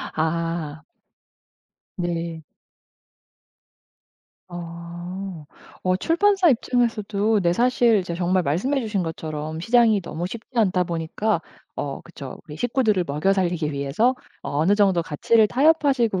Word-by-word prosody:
아. 160 -1 -2 1.2
네. 170 -2 -3 2.1
어. 175 +1 -7 0.4
어 185 0 +2
출판사 375 - +3
입장에서도 225 -5 +1
네 170 -1 +2
사실 240 +1 +3
이제 180 -3 -3
정말 180 +1 +1
말씀해 200 - 0
주신 210 -5 -1
것처럼 155 -1 -5
시장이 225 +1 +4
너무 170 +1 -4
쉽지 225 +5 -8
않다 185 -4 +3
보니까 170 +4 -1 0.3
어 140 -1 -4
그쵸 140 -6 -9
우리 150 0 -9
식구들을 220 - +1
먹여 150 +7 +1
살리기 175 -5 0
위해서 140 - +1 0.3
어 - - -5
어느 180 +7 +4
정도 195 -5 +3
가치를 215 +8 +3
타협하시고 270 - +3
185 Hz, 255 characters per minute, -23 LUFS, 165-225 Hz, 2.1 s, 시장이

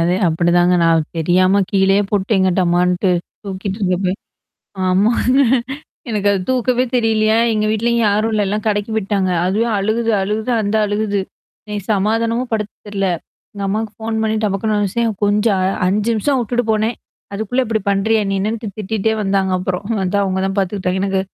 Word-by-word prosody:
அது 175 +2 +2
அப்படிதாங்க. 175 +2 +2
நான் 165 -2 +3
தெரியாம 185 +4 +3
கீழயே 195 +1 +3
போட்டேங்க 195 -1 +1
டமான்ட்டு 180 +1 +2 0.3
தூக்கிட்டு 195 +1 -4
இருக்கப்ப. 185 -1 0 0.7
ஆமாங்க. 220 +7 +2 0.7
எனக்கு 205 -2 0
அது 200 - +1
தூக்கவே 255 0 +1
தெரியலையா? 220 -2 +2 0.2
எங்க 215 -1 0
வீட்லயும் 235 +1 +1
யாரும் 215 +2 +1
இல்லல்ல 205 -1 0
கடைக்கி 205 +1 -1
போய்ட்டாங்க. 200 -3 0 0.2
அதுவே 210 +5 +1
அழுகுது 225 +3 0
அழுகுது 215 +4 -2
அந்த 205 +1 0
அழுகுது. 205 -1 -1 0.5
எனக்கு 210 -2 -5
சமாதானமும் 230 +4 0
படுத்த 210 -1 -2 0.2
தெரில. 195 -1 -1 0.5
எங்க 200 - -6
அம்மாவுக்கு 215 +2 -2
ஃபோன் 220 0 -2
பண்ணி 220 0 0
டப்பக்கனு 210 +1 0
வெச்சேன் 225 +3 0
கொஞ்சம் 205 0 +2
அ - - +2 0.2
5 210 +4 +1
நிமிஷம் 265 +6 +1
விட்டுட்டு 245 +1 -1
போனேன். 220 +2 0 0.4
அதுக்குள்ள 220 +5 -1
இப்டி 220 -1 0
பண்றியா? 215 +3 +2
நீனு 195 +3 0
திட்டிட்டே 215 +1 -2
வந்தாங்க 195 -1 0
அப்புறம். 185 +1 -3 0.2
அதான் 200 +2 +1
அவங்க 190 -1 -1
தான் 195 +1 -3
பார்த்துக்கிட்டாங்க. 190 -1 -1
எனக்கு. 195 -1 0
205 Hz, 150 wpm, -18 LUFS, 190-220 Hz, 0.7 s, நான்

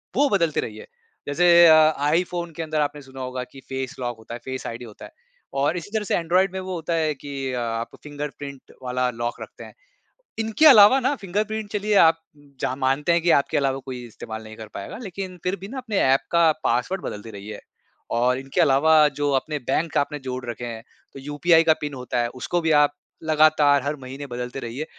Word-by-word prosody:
वो 285 +2 +3
बदलते 170 - +1
रहिए। 110 -1 -8 0.4
जैसे 170 +3 +6
अ, 155 -2 +5
iPhone 175 0 -1
के 165 - -4
अंदर 155 -1 -1
आपने 145 0 -2
सुना 135 -1 -11
होगा 130 0 -4
कि 135 - -12
फेस 130 +1 -4
लॉक 120 -2 -3
होता 110 +1 -10
है, - - -8
फेस 130 0 -5
आईडी 120 +1 -6
होता 110 -3 -12
है। - - -13 0.5
और 150 +5 +1
इसी 175 +3 -7
तरह 220 -1 0
से - - 0
Android 185 +4 +2
में 190 - -3
वो 185 0 -5
होता 170 0 -3
है 160 -2 +1
कि 135 -1 -5
अ, 125 - -2
आप 115 0 -3
फिंगरप्रिंट 145 -2 -8
वाला 125 0 0
लॉक 120 0 -4
रखते - - -10
हैं। - - -12 0.7
इनके 225 +7 +1
अलावा 245 -1 +8
ना 265 +3 0
फिंगरप्रिंट 210 +1 -3
चलिए 210 0 -1
आप, 165 0 +4 0.4
जहाँ 130 - -1
मानते 135 +4 +1
हैं 170 - +2
कि 175 - +1
आपके - - -3
अलावा 135 -1 0
कोई 125 -2 -6
इस्तेमाल 110 0 -8
नहीं 110 0 -11
कर 110 - -9
पाएगा 100 - -6
लेकिन 185 -2 -6
फिर 180 +2 0
भी 195 - -7
ना 265 - -7
अपने 230 -6 -3
ऐप 135 +1 +4
का 170 -2 +5
पासवर्ड 125 +11 0
बदलते 105 +2 -6
रहिए। 100 +1 -8 0.5
और 125 +2 +2
इनके 135 +6 -1
अलावा 155 +1 +5
जो 145 0 +1
अपने 150 +1 -5
बैंक 160 +3 0
आपने 145 +1 -1
जोड़ 130 -1 -5
रखे 120 +1 -5
हैं 115 -1 -7 0.3
तो - - -9
यूपीआई 150 +4 +3
का 160 -1 +5
पिन 145 -1 -4
होता 125 -2 -3
है 120 - 0
उसको 175 +6 -1
भी 160 -1 +1
आप 145 0 +2 0.3
लगातार 155 -3 +4
हर 145 +1 -2
महीने 135 +2 -8
बदलते 125 +1 -5
रहिए। 125 +5 -5
145 Hz, 210 wpm, -23 LUFS, 125-170 Hz, 0.7 s, अलावा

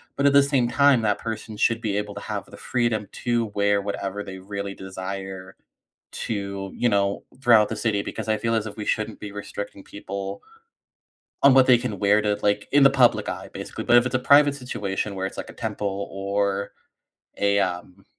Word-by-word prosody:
but 140 - 0
at 140 - +4
the 140 - +7
same 140 -4 +1
time, 140 0 +4
that 105 -2 +1
person 110 -1 -5
should 115 +2 +2
be 105 -3 -1
able 105 0 -3
to 100 - -6
have 105 -3 -4
the - - -13
freedom 120 -4 -1 0.2
to 120 -1 +1
wear 100 0 +2
whatever 100 0 -4
they 95 0 -8
really 100 +1 -5
desire 95 0 -7 0.6
to, 100 -2 -4
you 120 - +2
know 100 -2 0 0.2
throughout 115 -5 +6
the 110 - -3
city, 105 -2 0
because - - -6
I 110 - +2
feel 115 0 -1
as 110 -1 0
if 105 - -9
we 105 - -5
shouldn't 110 0 -2
be 105 - -7
restricting 100 -1 -7
people 100 -1 -6 1.0
on 140 - +8
what 130 -1 +6
they 125 - +7
can 115 -5 -4
wear 105 +1 +3
to, 105 -1 +1
like, 105 0 +1
in 145 - +5
the 135 - +8
public 130 -3 +3
eye - - -5
basically. - - -6
But 120 - +5
if 120 - +2
it's 125 - -3
a - - +4
private 140 +2 +5
situation 105 -6 -3
where 95 0 -2
it's - - -7
like - - -6
a - - -11
temple 100 -3 -4
or 100 0 -1 0.7
a, 100 0 +2
um, 90 +1 -3
105 Hz, 205 wpm, -24 LUFS, 100-120 Hz, 1.0 s, on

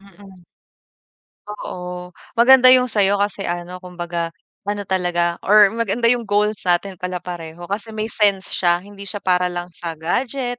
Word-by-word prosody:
Mm. 195 -2 -17 1.0
Oo, 180 -3 -7 0.2
maganda 255 +2 +6
yung 250 -1 +2
sa'yo. 200 -1 +2
Kasi 205 -1 -2
ano 175 +1 -4
kumbaga 175 -2 -5 0.3
ano 205 0 -2
talaga 175 -2 0
or 210 0 +7
maganda 230 +1 0
yung 240 -2 0
goals 210 +1 +1
natin 180 +1 +1
pala 180 -1 -4
pareho. 175 0 -8
Kasi 220 +2 -4
may 215 +1 -3
sense 200 -3 +1
siya, 175 0 +2
hindi 200 0 -11
siya 200 +2 -4
para 180 -1 +2
lang 175 0 -5
sa 170 -1 -6
gadget, 245 - -2
190 Hz, 155 wpm, -20 LUFS, 175-210 Hz, 1.0 s, or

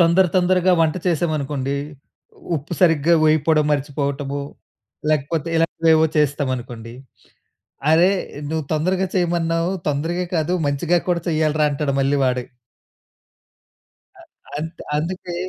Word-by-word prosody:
తొందర, 170 +3 +4
తొందరగా 185 0 +3
వంట 160 +1 +2
చేసామనుకోండి. 145 -5 -1 0.8
ఉప్పు 150 +5 -7
సరిగ్గా 165 -2 +4
వేయిపోవడం 155 0 +3
మర్చిపోవటము, 140 -1 -2 0.7
లేకపోతే 155 +2 -1
ఇలాంటివేవో 165 -1 +3
చేస్తామనుకోండి, 130 -5 -1 1.0
"అరే 170 +4 +5 0.4
నువ్వు 160 -1 -2
తొందరగా 185 +5 +1
చేయమన్నావు, 170 -1 0 0.2
తొందరగా 165 +5 -1
కాదు 160 +3 0
మంచిగా 165 +5 +1
కూడా 175 -1 +1
చెయ్యాలిరా 155 -1 +2
అంటాడు" 140 -1 -1
మళ్ళీ 140 +1 +2
వాడే. 125 -1 0 1.8
అ - - -14 0.4
అంత్ 160 +2 -6 0.2
అందుకే, 175 +3 -4
155 Hz, 100 wpm, -21 LUFS, 145-170 Hz, 1.8 s, అరే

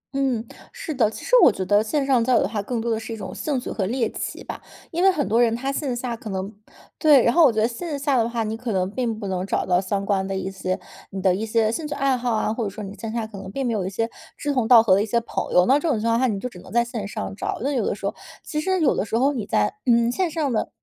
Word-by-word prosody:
嗯， 260 -5 0 0.3
是 310 - -5
的， 230 -5 +2
其 - - -9
实 485 - -7
我 - - +8
觉 190 -2 -4
得 205 +2 +4
线 275 +6 0
上 260 -4 +3
交 255 +2 +2
友 - - +5
的 - - 0
话 210 0 -3
更 235 +3 -3
多 230 +1 -1
的 220 - 0
是 225 +1 -8
一 225 - -4
种 - - -7
兴 285 -4 -2
趣 - - -6
和 195 -4 -1
猎 240 0 0
奇 - - -5
吧， - - -7 0.3
因 340 - -1
为 385 - +7
很 305 -6 -1
多 225 +3 +3
人 230 -1 +3
他 265 +3 -2
线 275 -3 -2
下 240 -1 -3
可 225 - -9
能 195 +2 -4 0.5
对， 295 -6 +6
然 235 - +3
后 340 - +6
我 270 - +6
觉 220 - -1
得 220 - +3
线 290 +6 -5
下 280 -1 0
的 230 -1 +2
话， 235 -1 -1
你 220 +1 -3
可 235 +1 -4
能 185 -2 +1
并 230 -2 -2
不 210 - -6
能 185 -1 -2
找 195 - -1
到 180 0 +2
相 195 +1 -2
关 195 -1 0
的 195 0 -2
一 190 0 -3
些， 185 -1 -3 0.3
你 195 - -6
的 190 -1 +3
一 210 +5 -3
些 220 0 +2
兴 300 +6 -3
趣 - - -4
爱 275 -2 +2
好 245 0 -2
啊， 215 0 0
或 230 - -2
者 205 - -1
说 210 +2 -8
你 195 0 -7
线 225 +1 -6
下 230 -1 -2
可 215 -2 -9
能 190 0 -8
并 270 +4 -2
没 235 - 0
有 190 -4 -1
一 - - -2
些 225 +4 -1 0.3
志 290 0 -2
同 250 -5 +1
道 235 -2 +8
合 195 -5 +4
的 195 - +4
一 - - 0
些 235 +2 +2
朋 230 - -4
友， 180 0 +5
那 275 +3 +4
这 330 - -1
种 250 -8 +1
情 225 - -1
况 230 0 +2
下 260 - +3
你 205 -4 -1
就 250 - -4
只 180 -8 -11
能 - - -13
在 235 +1 +2
线 230 -4 -5
上 200 - -5
找， - - -3
那 280 - 0
有 255 -6 0
的 - - -1
时 200 - -8
候 200 - -1 0.3
其 300 - -3
实 375 +3 0
有 280 - +3
的 - - 0
时 220 - -1
候 275 +4 +3
你 230 -7 -4
在 105 0 +1
嗯， 235 0 +4
线 360 +7 0
上 300 -5 -1
的 220 - -1
230 Hz, 350 characters per minute, -23 LUFS, 205-260 Hz, 0.5 s, 我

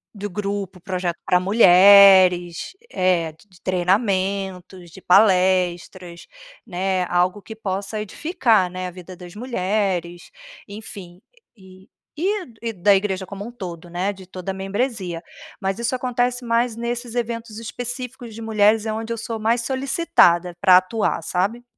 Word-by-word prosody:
do 205 +1 -5
grupo, 195 -1 -4
projeto 180 -1 -3
pra 180 - +3
mulheres, 185 - +6 0.2
eh, 180 -4 +1
d 155 - -26
de 180 -1 -21
treinamentos, 185 -1 -1
de 190 - -13
palestras, 180 -2 +2 0.4
né. 185 0 -1
Algo 180 +3 +1
que 220 - -10
possa 200 0 -4
edificar, 220 - +1
né, 185 +1 -6
a - - -7
vida 180 0 -11
das 175 -1 -11
mulheres, 190 -6 -2 0.4
enfim. 200 -4 -10 0.4
E 190 0 -17 0.3
e 380 +4 -1 0.2
e 230 -1 -3
da 200 +2 +3
igreja 190 -1 -1
como 200 +5 -8
todo, 175 -6 -8
né, 180 +4 -2
de 190 -2 -14
toda 185 +1 -6
a - - -5
membresia. 195 -3 -3 0.4
Mas, 195 +3 -2
isso 235 +2 -1
acontece 245 0 -1
mais 230 0 +1
nesses 240 0 -4
eventos 230 -2 -4
específicos 245 0 -7
de 230 - -8
mulheres, 220 0 +2
é 215 - -2
onde 225 +1 -5
eu 230 - -2
sou 225 0 -5
mais 230 +2 +1
solicitada 260 - +2
pra 185 -3 +7
atuar, 185 -2 -1
sabe? 200 +9 -1
195 Hz, 145 wpm, -21 LUFS, 180-225 Hz, 0.4 s, pra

